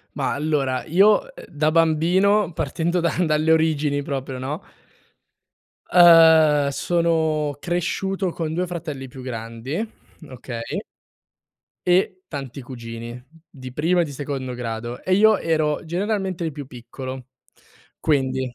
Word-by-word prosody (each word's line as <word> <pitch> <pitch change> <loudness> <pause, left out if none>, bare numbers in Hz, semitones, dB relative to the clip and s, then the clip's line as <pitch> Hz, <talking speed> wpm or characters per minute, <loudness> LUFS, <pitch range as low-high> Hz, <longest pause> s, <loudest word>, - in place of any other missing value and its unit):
Ma - - -1
allora 140 -3 -1
io, 195 +6 +5
uhm, - - -16 0.2
da 155 0 0
bambino, 175 +5 +3
partendo 165 +4 -1
da 170 -1 0
dalle 155 0 +2
origini 155 -3 +1
proprio, 135 -2 -4
no? 135 +4 -4 1.3
Ehm, 160 -4 +7
sono 155 0 0
cresciuto 185 +3 -1
con 160 -2 -4
2 180 +2 -1
fratelli 155 -6 -6
più 130 +1 -11
grandi, 115 - -5 0.5
okay. 120 -2 -6 1.1
E 185 +1 +2
tanti 140 -3 -6
cugini, 120 -1 -8 0.3
di 130 -3 -10
primo 170 +6 +1
e - - +3
di 150 - -7
secondo 135 -2 -4
grado 120 0 -5
e 185 - +2
io 215 +1 +5
ero 155 -2 0
generalmente 190 +1 -2
il 160 - -2
più 140 -1 -8
piccolo. 130 +1 -8 0.7
Quindi 130 -4 0
150 Hz, 125 wpm, -22 LUFS, 130-170 Hz, 1.3 s, Ehm